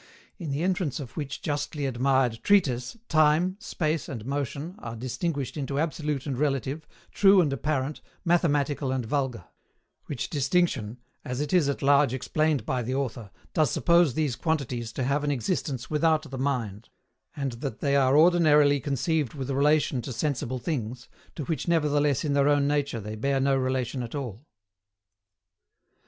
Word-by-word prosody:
In 165 -5 -5
the 140 +4 -1
entrance 180 - 0
of 130 -4 -8
which 145 -4 -5
justly 145 -1 -2
admired 130 -2 +1
treatise, 145 - +2
Time, 155 +4 +3
Space, 160 -7 -2
and 115 -6 -6
Motion 140 +4 -3
are 115 -1 -6
distinguished 135 +4 -3
into 140 -1 -3
absolute 150 -2 -1
and 135 -4 -3
relative, 145 +1 -1 0.2
true 195 -1 +6
and 150 -6 +2
apparent, 145 0 -2 0.2
mathematical 145 -5 +1
and 130 -3 -1
vulgar; 130 - -2 0.6
which 140 -5 -3
distinction, 135 - 0 0.3
as 125 -2 -4
it 150 +2 -2
is 170 -6 +4
at 140 - -3
large 140 -2 +4
explained 155 +3 0
by 130 -1 -1
the 125 +3 -2
author, 120 -6 -3 0.2
does 155 -4 +3
suppose 170 +1 +3
these 150 -6 0
quantities 125 -8 -2
to 130 - -2
have 140 +3 0
an 145 - 0
existence 135 - -2
without 155 -1 +1
the 130 - -5
mind; 115 -6 -2 0.5
and 140 -2 -2
that 110 - -4
they 140 -1 +1
are 135 0 +4
ordinarily 150 -4 +5
conceived 140 +1 -1
with 135 -1 -4
relation 145 -1 +2
to 130 - -6
sensible 130 0 -2
things, 125 -3 -4 0.3
to 150 - -4
which 160 +3 -3
nevertheless 150 -3 +2
in 145 - 0
their 140 0 +3
own 145 -1 +3
nature 145 -4 0
they 105 0 -6
bear 135 +5 0
no 135 0 +2
relation 130 -1 -1
at 120 +3 -6
all. 130 -1 -6
140 Hz, 160 wpm, -27 LUFS, 130-155 Hz, 0.6 s, true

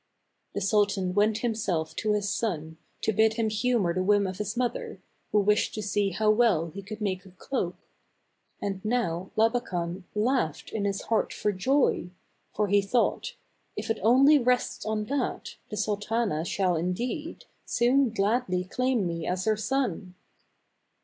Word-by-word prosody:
The - - -1
sultan 200 -2 +1
went 210 +2 +3
himself 200 -9 -1
to 215 -1 +1
his 205 -1 0
son, 160 -8 -2 0.3
to 220 - +1
bid 220 +2 +3
him 225 -2 +1
humor 215 -5 +1
the 185 - 0
whim 205 +1 +3
of 185 0 -4
his 210 +2 -3
mother, 245 -1 -2 0.3
who 210 - +4
wished 210 +1 +2
to 215 - -3
see 205 0 +1
how 215 +3 +2
well 215 -8 +3
he 200 - -7
could 215 +2 -8
make 185 -3 -1
a 195 - -14
cloak. 185 0 -3 0.8
And 195 -2 -4
now 190 -6 -1
Labakan 195 -6 0
laughed 210 - 0
in 205 -2 -2
his 200 -1 -1
heart 225 - 0
for 210 - -1
joy; 250 -1 +1 0.5
for, 210 0 +1
he 200 +1 +4
thought, 240 - 0 0.4
"If - - -3
it 225 - -2
only 270 +7 +6
rests 250 -3 0
on 215 -1 -1
that, 270 +1 -3
the 210 - -5
sultana 210 -4 -1
shall, 185 -1 +1
indeed, 230 - -3 0.2
soon 255 +2 +3
gladly 205 -3 0
claim 250 +2 0
me 165 -2 -3
as 185 +2 -1
her 220 -1 +3
son." 215 -6 -2
210 Hz, 160 wpm, -27 LUFS, 185-230 Hz, 0.8 s, only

